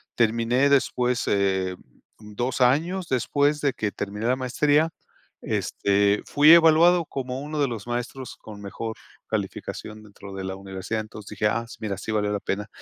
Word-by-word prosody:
Terminé 115 +4 +2
después, 125 -3 +2
eh, 95 -2 +1 0.4
2 115 +5 -3
años 165 +9 +2
después 145 +3 +1
de 140 -2 +1
que 105 -2 -2
terminé 105 +2 -5
la 125 - +3
maestría, 145 +5 +2 0.5
este, 100 +1 +1
fui 150 +2 +6
evaluado 170 +1 +6
como 130 -2 -5
uno 150 +1 -4
de 140 - +3
los 115 -4 -6
maestros 120 +1 -4
con 105 -2 -11
mejor 110 +3 -5 0.3
calificación 110 +1 -5
dentro 100 -1 -12
de 95 0 -5
la 95 0 -4
universidad. 95 +3 -4
Entonces 105 -1 -10
dije: 105 - +2
"Ah, 115 +2 -2
sí, - - -11
mira, 105 -3 -3
sí 100 - -5
valió 105 -1 0
la 105 - -1
pena". 105 +2 -3
115 Hz, 165 wpm, -25 LUFS, 105-140 Hz, 0.5 s, fui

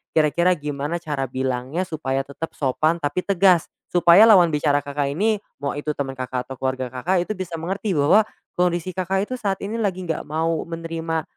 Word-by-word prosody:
kira-kira 165 +4 +3
gimana 145 +1 -4
cara 145 -5 -3
bilangnya 130 +5 -2
supaya 135 -4 -2
tetap 150 +4 -6
sopan 155 +5 +1
tapi 145 +4 0
tegas 190 -3 +3 0.2
supaya 175 +3 +7
lawan 190 -6 +7
bicara 145 -1 +2
Kakak 140 0 -2
ini, 210 +6 +1 0.2
mau 140 - -1
itu 150 +1 -2
temen 135 -2 -4
Kakak, 125 -1 -4
atau 135 - -5
keluarga 130 -1 -2
Kakak, 175 +8 0
itu - - -3
bisa 180 -3 -5
mengerti 195 +5 -3
bahwa 155 +10 +5 0.3
kondisi 180 0 +1
Kakak 190 +2 -1
itu 255 - -2
saat 195 -4 -1
ini 205 +3 -3
lagi 190 -4 -1
nggak 160 - -2
mau 160 +1 -1
menerima 165 -1 -3
165 Hz, 180 wpm, -22 LUFS, 140-180 Hz, 0.3 s, supaya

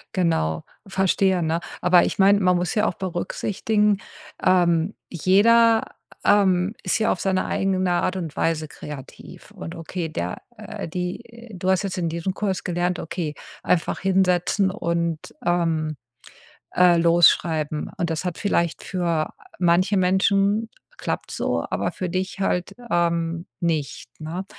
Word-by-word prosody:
Genau, 160 - +1 0.2
verstehe, 190 -1 +2
ne? 160 +1 0 0.2
Aber 180 0 +5
ich - - -3
meine, 200 +1 +5
man 180 -2 +3
muss 175 -1 -1
ja 215 0 +2
auch - - -1
berücksichtigen, 205 +3 0 0.5
ähm, 175 0 +3
jeder, 225 +6 +4 0.4
ähm, 195 -1 +3
ist 185 - +1
ja 220 - +2
auf - - -2
seine 190 -1 0
eigene 185 -1 0
Art 175 +1 +1
und 165 -5 -5
Weise 160 -1 0
kreativ. 140 -2 -10
Und 80 0 -8
okay, 165 0 -4
der, 90 - -4 0.2
äh 210 -3 -7
die 225 +7 -6
du 185 0 -2
hast 190 0 +2
jetzt 195 -2 -3
in 170 -2 -1
diesem 170 +3 -3
Kurs 195 -2 -2
gelernt, 175 0 -1
okay, 160 -2 -4 0.3
einfach 170 - +1
hinsetzen 190 +1 +2
und, 170 -4 -1 0.3
ähm, 165 -3 0 0.8
äh, 180 -1 +6
los 170 0 +6
schreiben. 155 -2 -2
Und 170 -1 -1
das 160 +3 -2
hat 180 -2 -3
vielleicht 170 -5 0
für 170 -4 -1 0.3
manche 185 +3 +3
Menschen 195 +3 +2 0.3
klappt's - - -4
so, - - -1
aber - - -1
für 185 - -4
dich 185 +2 -3
halt, 180 -2 -1 0.2
ähm, 170 0 0
nicht, 155 -7 -2
ne? 165 +5 -5
180 Hz, 145 wpm, -23 LUFS, 165-190 Hz, 0.8 s, äh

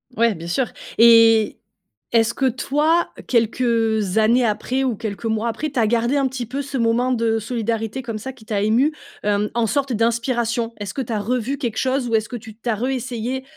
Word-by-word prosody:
Ouais, 230 -2 +2
bien 165 +1 -8
sûr. 240 +8 -1 0.3
Et, 230 -2 +6 0.5
est-ce 230 0 +3
que 270 - -1
toi, 300 +7 +1 0.2
quelques, 230 0 +1
heu, 225 -2 +2 0.2
années 235 +3 +4
après 240 +5 -1
ou 245 - 0
quelques 215 0 -6
mois 220 +1 0
après, 300 +7 -3
tu 260 - -2
as 220 - +3
gardé 235 +4 +1
un 275 -2 +2
petit 255 -2 -4
peu 270 +5 -4
ce 280 0 -5
moment 240 +2 +1
de 230 -2 +1
solidarité, 225 +1 -3
comme 230 -3 -5
ça, 265 +5 -6
qui 230 -4 -18
t'a 205 -2 -1
ému, 240 +9 +2 0.3
hem, 210 0 +1
en 235 0 +1
sorte 275 +5 0
d'inspiration? 235 0 0
Est-ce 205 -2 -6
que 275 - -3
tu 240 -2 -6
as 215 - 0
revu 250 +5 -1
quelque 240 -6 -3
chose? 260 -1 0
Ou 230 - +1
est-ce 215 -1 0
que 245 - -5
tu 220 -1 -12
tu 235 +2 -5
as 225 - +2
re 230 +4 -2
essayé 255 0 -3
230 Hz, 215 wpm, -21 LUFS, 220-255 Hz, 0.5 s, Et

